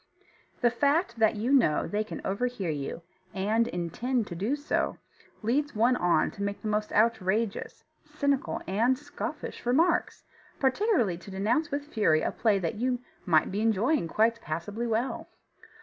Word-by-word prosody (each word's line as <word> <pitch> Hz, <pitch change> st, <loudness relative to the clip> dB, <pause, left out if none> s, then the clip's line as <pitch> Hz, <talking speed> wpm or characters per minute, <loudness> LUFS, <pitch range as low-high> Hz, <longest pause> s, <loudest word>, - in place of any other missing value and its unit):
The 240 Hz, -2 st, +4 dB
fact 280 Hz, +1 st, +1 dB
that 220 Hz, -1 st, +4 dB
you 225 Hz, +5 st, -1 dB
know 235 Hz, -, +4 dB
they 210 Hz, +1 st, -1 dB
can 215 Hz, -, -8 dB
overhear 200 Hz, -3 st, -1 dB
you, 150 Hz, +3 st, -5 dB, 0.3 s
and 215 Hz, +4 st, +1 dB
intend 230 Hz, +7 st, -1 dB
to 175 Hz, -, -7 dB
do 210 Hz, +11 st, 0 dB
so, 290 Hz, 0 st, -1 dB, 0.5 s
leads 280 Hz, +5 st, 0 dB
one 235 Hz, +4 st, +4 dB
on 175 Hz, -6 st, +2 dB
to 200 Hz, -, -10 dB
make 200 Hz, +2 st, -3 dB
the -, -, -2 dB
most 210 Hz, 0 st, -1 dB
outrageous, 220 Hz, -1 st, 0 dB, 0.2 s
cynical, 280 Hz, -2 st, -1 dB
and 230 Hz, +7 st, +2 dB
scoffish 290 Hz, +1 st, -6 dB
remarks, 280 Hz, +9 st, +2 dB, 0.4 s
particularly 265 Hz, -, +2 dB
to 195 Hz, -, -12 dB
denounce 215 Hz, +11 st, 0 dB
with 285 Hz, +1 st, -3 dB
fury 160 Hz, -8 st, +3 dB
a -, -, 0 dB
play 220 Hz, -4 st, +2 dB
that 195 Hz, +4 st, -3 dB
you 250 Hz, +1 st, +1 dB, 0.3 s
may 160 Hz, -3 st, +5 dB
be 200 Hz, +3 st, -3 dB
enjoying 225 Hz, -, +2 dB
quite 225 Hz, +5 st, +2 dB
passably 200 Hz, +9 st, -4 dB
well. 230 Hz, +3 st, -2 dB
225 Hz, 155 wpm, -28 LUFS, 195-255 Hz, 0.5 s, may